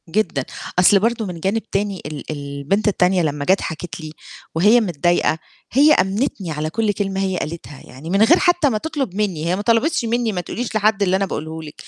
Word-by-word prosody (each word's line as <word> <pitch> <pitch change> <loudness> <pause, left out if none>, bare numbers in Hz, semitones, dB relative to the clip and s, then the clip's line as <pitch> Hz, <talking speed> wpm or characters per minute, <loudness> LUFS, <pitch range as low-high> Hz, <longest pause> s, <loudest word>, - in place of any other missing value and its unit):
جدًا، 165 -8 0 0.3
أصل 195 +2 +6
برضه 230 +1 0
من 180 -3 -6
جانب 200 +6 0
تاني 200 -1 -1
ال 150 -1 -6
البنت 140 +8 -2
التانية 185 -2 +2
لمّا 145 -2 -2
جَت 190 +4 +3
حكِت 165 +2 -6
لي، 155 -1 -7 0.4
وهي 210 +8 +5
متضايقة، 175 -3 +1 0.3
هي 290 +5 +6
آمنتني 195 - 0
على 155 +1 -3
كُلّ 215 +5 0
كلمة 195 -1 -2
هي 190 -1 -1
قالتها 155 -4 -6
يعني 135 +6 -10
من 195 +3 +2
غير 335 +10 +5
حتى 350 -5 +3
ما 220 - 0
تطلب 275 - -3
مني، 190 -7 -1
هي 175 +2 +1
ما 200 - -3
طلبِتش 235 +6 +1
مني: 235 0 0
"ما 180 -3 -2
تقوليش 225 +6 -5
لحد 215 -1 +2
اللي 185 -1 +2
أنا 195 +1 +1
باقوله 160 -3 -5
لِك." 150 -1 -10
195 Hz, 200 wpm, -20 LUFS, 160-220 Hz, 0.4 s, أصل